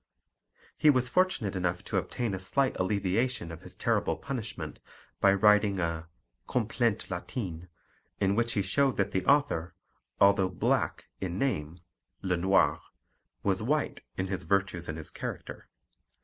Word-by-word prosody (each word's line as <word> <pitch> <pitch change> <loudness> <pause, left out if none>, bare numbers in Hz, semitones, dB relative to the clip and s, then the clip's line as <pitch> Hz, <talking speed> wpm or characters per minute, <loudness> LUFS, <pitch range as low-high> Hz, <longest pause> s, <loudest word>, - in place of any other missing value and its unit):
He 155 - +6
was 130 -3 +4
fortunate 130 - +1
enough 90 -1 -1
to - - -2
obtain 120 -5 -2
a 95 - -3
slight 130 +8 +1
alleviation 100 +1 0
of 80 - -9
his - - -9
terrible - - 0
punishment 110 - -5 0.4
by 100 - +6
writing 105 0 +4
a 85 -1 -2 0.4
Complainte 120 -2 0
latine, 90 -1 -5 0.5
in 100 -1 +2
which 115 +2 +1
he 100 - +1
showed 135 +7 +2
that 100 - +1
the 95 - 0
author, 115 - +2 0.4
although 100 -1 +5
black 90 - 0
in 90 -2 -3
name 85 - -2 0.4
(le 90 -2 +1
noir), 95 +3 +3 0.6
was - - +2
white - - 0 0.2
in 95 - 0
his 95 -1 -2
virtues 95 -4 0
and 80 - -3
his 80 - -6
character. - - -6
95 Hz, 145 wpm, -29 LUFS, 90-115 Hz, 0.6 s, He